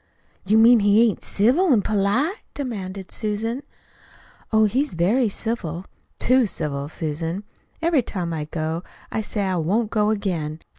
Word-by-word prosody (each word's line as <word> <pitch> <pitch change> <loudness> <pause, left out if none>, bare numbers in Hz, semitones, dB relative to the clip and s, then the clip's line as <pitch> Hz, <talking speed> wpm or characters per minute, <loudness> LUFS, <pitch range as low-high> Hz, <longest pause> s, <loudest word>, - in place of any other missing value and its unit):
"You 215 +3 +4
mean 230 +1 +7
he 205 +2 +5
ain't 215 - -3
civil 270 - +3
an' 220 -6 +4
polite?" 215 - +1 0.2
demanded 195 -8 -5
Susan. 225 +4 -2 0.9
"Oh, 220 -1 +5
he's 260 +3 0
very 210 +8 +2
civil 190 -6 -4 0.3
too 255 -2 +3
civil, 145 -5 -3
Susan. 165 +5 -3 0.4
Every 330 -5 +3
time 180 -7 -4
I 155 -2 -3
go 160 +1 -3 0.3
I 220 - -1
say 210 -1 -2
I 190 -2 0
won't 205 +7 0
go 210 -1 +2
again. 170 -7 -2
205 Hz, 145 wpm, -23 LUFS, 170-230 Hz, 0.9 s, mean